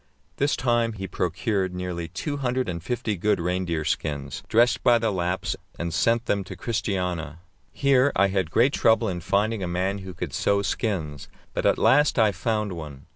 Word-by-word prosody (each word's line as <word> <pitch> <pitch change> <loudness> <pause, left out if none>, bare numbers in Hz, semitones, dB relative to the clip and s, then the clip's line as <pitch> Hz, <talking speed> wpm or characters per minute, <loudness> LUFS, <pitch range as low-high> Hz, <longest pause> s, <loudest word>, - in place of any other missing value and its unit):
This 140 +1 +2
time 120 -2 +1
he 95 -2 -6
procured 90 +2 -1
nearly 90 -2 -4
two 95 - -4
hundred 130 -1 -1
and 85 -2 -4
fifty 110 +2 -2
good 105 +4 +1
reindeer 85 -2 -1
skins, 75 -3 -2
dressed 120 +2 +3
by 120 -1 +6
the 115 -2 0
Lapps, 90 -1 -1 0.2
and 85 -1 -3
sent 115 +1 +2
them 100 -1 0
to 95 - -8
Christiania. 90 - -2 0.3
Here 140 0 +3
I 100 +1 +4
had 95 -4 0
great 120 - +3
trouble 115 0 +3
in 90 -3 -3
finding 100 +4 0
a 90 - -2
man 95 +3 -1
who 95 -2 -8
could 85 -5 -5
sew 100 0 +1
skins, 85 - -2 0.3
but - - 0
at - - +3
last 145 +2 +4
I 110 -2 +5
found 105 +2 -1
one. 75 -5 -8
95 Hz, 180 wpm, -25 LUFS, 85-115 Hz, 0.3 s, by